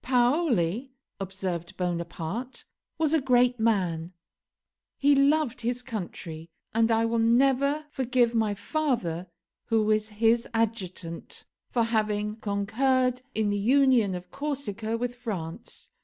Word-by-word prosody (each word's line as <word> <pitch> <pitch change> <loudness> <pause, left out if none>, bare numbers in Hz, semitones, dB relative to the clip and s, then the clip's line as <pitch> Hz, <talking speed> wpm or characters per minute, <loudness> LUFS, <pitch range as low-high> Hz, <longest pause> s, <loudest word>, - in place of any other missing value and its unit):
"Paoli," 245 - +2 0.3
observed 190 -2 -4
Bonaparte, 175 +7 -4 0.3
"was 315 -1 +1
a 320 - +3
great 250 -1 +3
man; 180 -7 +1 0.9
he 285 +1 +4
loved 275 -3 +2
his 245 +2 -2
country; 170 -8 -6 0.2
and 225 +1 +3
I 225 0 +3
will 230 0 0
never 270 +6 +3
forgive 250 -3 +1
my 220 -3 +1
father, 205 - -1 0.4
who 225 -2 +2
was 215 0 +1
his 225 +2 +2
adjutant, 185 -7 -3 0.2
for 235 - +1
having 210 -2 0
concurred 250 +5 +1
in 215 -2 +1
the 205 - 0
union 245 -3 +4
of 180 0 -8
Corsica 235 -7 -3
with 245 +1 -2
France. 215 -4 -6
230 Hz, 120 wpm, -27 LUFS, 200-255 Hz, 0.9 s, he